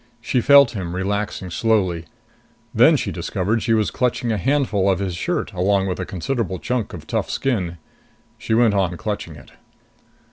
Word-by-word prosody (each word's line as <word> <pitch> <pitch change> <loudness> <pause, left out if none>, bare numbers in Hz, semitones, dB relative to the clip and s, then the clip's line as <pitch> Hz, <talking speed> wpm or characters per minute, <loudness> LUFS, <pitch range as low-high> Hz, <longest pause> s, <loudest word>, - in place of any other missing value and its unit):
She 120 +1 0
felt 140 0 +7
him 90 -6 -5
relaxing 100 -1 -3
slowly. 95 -5 0 0.7
Then - - +6
she - - -3
discovered 110 +5 -1
she 115 -1 +2
was 110 -1 +1
clutching 125 -1 -1
a 110 - 0
handful 125 -6 +1
of 95 - +2
his 95 -2 -3
shirt 85 - -2
along 95 +1 +1
with 95 -1 -3
a 95 - -4
considerable 95 +1 -2
chunk 120 +3 -3
of 85 -4 -8
tough - - -2
skin. 95 -11 -1 0.6
She 110 - -1
went 115 -2 +4
on 90 -3 0
clutching 105 -7 -4
it. 65 - -15
100 Hz, 170 wpm, -21 LUFS, 90-115 Hz, 0.7 s, felt